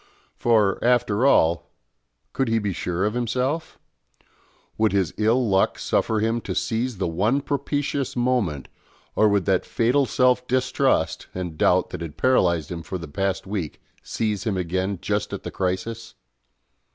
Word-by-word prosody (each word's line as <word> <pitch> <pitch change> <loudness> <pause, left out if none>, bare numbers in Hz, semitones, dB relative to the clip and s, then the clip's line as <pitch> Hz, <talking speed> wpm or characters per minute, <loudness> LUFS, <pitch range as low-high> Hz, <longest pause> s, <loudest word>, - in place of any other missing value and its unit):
For, 110 -4 +2
after 120 0 +3
all, 85 - +3 0.6
could 135 - 0
he 115 0 +2
be 105 -3 -1
sure 90 +2 -2
of 105 - 0
himself? 125 +7 -2 1.0
Would 110 -2 +1
his 95 -4 +1
ill 115 +3 +2
luck 95 -1 +2
suffer 110 -1 0
him 115 +2 0
to - - -5
seize 115 0 -1
the 90 - -1
one 105 +11 +1
propitious 140 -1 -2
moment, 120 - 0 0.5
or 110 - +4
would 100 -2 +1
that 95 -2 +2
fatal 125 +4 +1
self 125 +1 +2
distrust 130 -6 +1
and 90 -3 -4
doubt - - +2
that - - -6
had 80 -3 -7
paralysed 85 - +2
him 85 -1 -4
for 85 +4 -5
the 85 - -8
past 95 +5 -2
week 95 -6 -4 0.2
seize 105 -3 -2
him 110 -5 -1
again 95 +2 -1
just - - -1
at - - -5
the - - -5
crisis? 95 +5 -3
110 Hz, 155 wpm, -23 LUFS, 95-125 Hz, 1.0 s, or